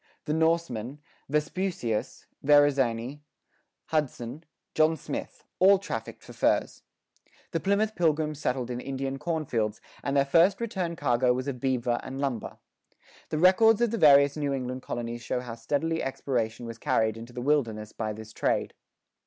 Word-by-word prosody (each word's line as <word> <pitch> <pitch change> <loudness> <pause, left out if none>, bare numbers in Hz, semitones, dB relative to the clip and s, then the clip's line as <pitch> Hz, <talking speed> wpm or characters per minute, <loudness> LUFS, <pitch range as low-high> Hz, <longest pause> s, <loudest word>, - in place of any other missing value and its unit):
The 150 - -1
Norsemen, 160 -6 0 0.3
Vespuccius, 150 - -2 0.2
Verrazani, 140 -3 +3 0.7
Hudson, 145 -2 -2 0.3
John 155 +1 +3
Smith, - - -6 0.2
all 195 +2 +7
trafficked 195 - -6
for - - -12
furs. - - +1 0.7
The - - 0
Plymouth 205 +2 +1
pilgrims 155 -4 0
settled 125 -3 -1
in 120 - -3
Indian 135 0 -4
cornfields, 125 -11 -1 0.2
and 140 0 -1
their 140 - +4
first 170 +7 +4
return 190 -7 -2
cargo 125 -4 +2
was 130 +2 -3
of 130 -3 -3
beaver 125 -2 0
and 135 +1 -7
lumber. 135 -6 -3 0.7
The 155 - -2
records 190 +6 +5
of 240 -2 +2
the 230 - -2
various 140 -3 +6
New 145 -2 -1
England 130 -1 -3
colonies 120 -1 -5
show 120 - -2
how 125 -2 -7
steadily 145 +8 -1
exploration 120 -4 -2
was 115 0 -8
carried 110 -1 +1
into 115 +2 -9
the 125 - -7
wilderness 115 -7 0
by 110 -1 -3
this 110 +1 -9
trade. - - 0
140 Hz, 150 wpm, -28 LUFS, 120-160 Hz, 0.7 s, all